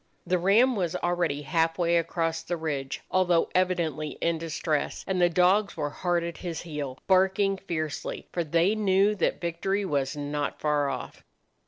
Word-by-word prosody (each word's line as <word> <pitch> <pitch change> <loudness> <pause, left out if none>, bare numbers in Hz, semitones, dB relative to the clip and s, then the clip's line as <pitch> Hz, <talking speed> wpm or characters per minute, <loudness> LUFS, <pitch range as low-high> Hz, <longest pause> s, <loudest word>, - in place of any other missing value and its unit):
The 180 0 +1
ram 225 +8 +4
was 175 -5 -1
already 175 -5 -1
half 165 +2 +1
way 170 -1 +2
across 165 0 -1
the 175 - -3
ridge, 145 -4 -3
although 180 -2 +2
evidently 170 -5 0
in 165 -1 0
distress, 155 -2 -2
and 185 -1 -1
the 175 - +5
dogs 185 +4 +3
were 145 -2 -2
hard 175 +1 0
at 170 -1 -5
his 170 -3 -5
heel, 145 -5 -5
barking 190 +1 +3
fiercely, 155 -6 -4
for 175 - -1
they 170 +5 +2
knew 200 -1 +3
that - - 0
victory 190 +4 -1
was 140 -3 -1
not 145 0 -3
far 150 -2 +1
off. 130 -2 -6
170 Hz, 165 wpm, -27 LUFS, 155-185 Hz, -, the